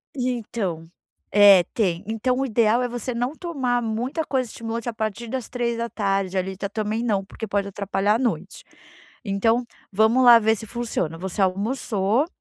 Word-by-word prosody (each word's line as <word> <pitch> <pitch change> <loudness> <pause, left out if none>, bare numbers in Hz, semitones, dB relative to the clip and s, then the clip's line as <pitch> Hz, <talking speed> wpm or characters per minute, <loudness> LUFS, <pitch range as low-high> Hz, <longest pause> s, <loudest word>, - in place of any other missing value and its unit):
Então, 225 -9 -3 0.4
é, 200 -3 +8
tem, 180 -6 0
então 235 +3 -1
o 270 - +1
ideal 230 0 +2
é 245 - -1
você 245 +1 -4
não 245 +3 -1
tomar 270 -9 -1
muita 240 +8 -2
coisa 255 -5 -1
de 230 +1 -5
a - - -1
partir 220 +1 -4
das 255 0 -4
15h, 225 -6 -1
ali, 190 +1 -2
ta 200 +1 -4
também 215 +2 -2
não 200 -4 0
porque 220 +3 -7
pode 200 -1 -1
atrapalhar 200 +1 0
à - - +1
noite. 195 -7 -3 0.6
Então, 225 +4 +1 0.3
vamos 220 +6 +4
lá 240 -1 +9
ver 220 0 +2
se 220 - -7
funciona, 220 -8 -3
você 190 +2 -4
almoçou 205 - 0
220 Hz, 165 wpm, -23 LUFS, 200-240 Hz, 0.6 s, lá